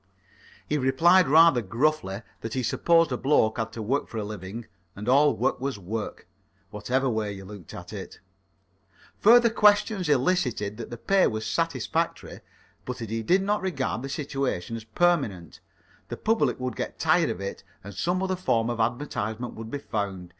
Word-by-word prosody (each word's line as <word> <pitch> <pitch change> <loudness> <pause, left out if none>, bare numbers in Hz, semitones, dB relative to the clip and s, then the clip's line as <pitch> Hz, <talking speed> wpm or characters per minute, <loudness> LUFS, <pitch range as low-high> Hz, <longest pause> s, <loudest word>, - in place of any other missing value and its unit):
He 150 - 0
replied 165 +8 +4
rather 155 -2 +6
gruffly 115 -1 -1 0.2
that 115 +1 -6
he 130 - -1
supposed 165 +6 +3
a 125 - -1
bloke 120 -6 +2
had 115 0 -2
to 110 - -5
work 135 +7 -1
for 115 - -8
his 105 - -2
living, 105 +2 -7 0.3
and 105 +3 -8
all 145 +3 +4
work - - 0
was 135 -3 -2
work, 105 +3 -5 0.5
whatever 125 +6 -1
way 110 -4 -1
you 95 -1 -9
looked 100 -3 -11
at - - -9
it. - - -8 1.0
Further 235 +1 +6
questions 205 -4 +3
elicited 125 - +1
that 115 - -7
the 120 - -7
pay 195 +10 +3
was 110 -1 -3
satisfactory, - - -2 0.4
but 125 - -5
that 115 -3 -7
he 115 0 -1
did 185 - +2
not 205 +1 0
regard 135 -10 -2
the 135 - -6
situation 135 - -3
as 115 -1 -8
permanent. 110 - 0 0.5
The - - -6
public 225 -9 +1
would 125 -2 -3
get - - -5
tired - - +3
of - - -4
it 100 0 -6 0.2
and 100 +1 -9
some 175 - -1
other 190 0 0
form 120 -10 0
of 120 - -5
advertisement 120 -1 -2
would 110 0 -8
be 145 - -3
found. 100 -8 -4
125 Hz, 175 wpm, -26 LUFS, 110-155 Hz, 1.0 s, rather